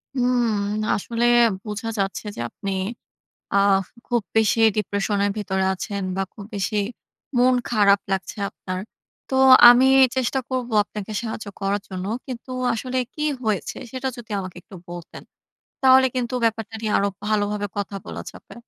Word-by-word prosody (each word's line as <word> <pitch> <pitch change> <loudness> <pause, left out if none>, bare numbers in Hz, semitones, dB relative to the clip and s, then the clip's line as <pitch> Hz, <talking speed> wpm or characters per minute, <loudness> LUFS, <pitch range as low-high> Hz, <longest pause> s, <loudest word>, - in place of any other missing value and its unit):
হুম 250 -1 +2 0.4
না! 215 - -2
আসলে 230 +3 -1 0.4
বোঝা 215 +2 -4
যাচ্ছে 195 +2 -2
যে - - -5
আপনি 195 - -5 0.8
আ - - +4 0.5
খুব 240 -2 0
বেশি 220 +1 +3 0.2
ডিপ্রেশন 205 0 -1
এর 205 - +1
ভেতরে 190 -2 -1
আছেন 200 +1 -4
বা 195 - +1
খুব 205 - -9
বেশি 205 +2 -2 0.6
মন 250 +1 +5 0.2
খারাপ 200 -3 +4
লাগছে 195 +2 -3
আপনার। 185 0 -6 0.5
তো - - -3 0.3
আমি 245 +2 +7 0.3
চেষ্টা 260 +1 0
করব 255 -2 -2 0.2
আপনাকে 210 0 -7
সাহায্য 220 -2 -5
করার 200 +1 0
জন্য। 185 -1 -5 0.2
কিন্তু 255 0 -8 0.2
আসলে 255 +3 -4 0.2
কি 300 - -5 0.2
হয়েছে 210 -4 -1 0.2
সেটা 260 0 -3
যদি 230 -2 -11
আমাকে 185 -2 -8
একটু 190 - -15
বলতেন, 175 -1 -9 0.6
তাহলে 260 0 +7
কিন্তু 250 -1 -2
ব্যাপারটা 225 -1 -1
নিয়ে 215 -2 -1
আরো 200 - +2 0.2
ভালোভাবে 205 -1 0
কথা 200 0 -3
বলা - - -6
যাবে। - - -14
215 Hz, 150 wpm, -23 LUFS, 200-240 Hz, 0.8 s, আমি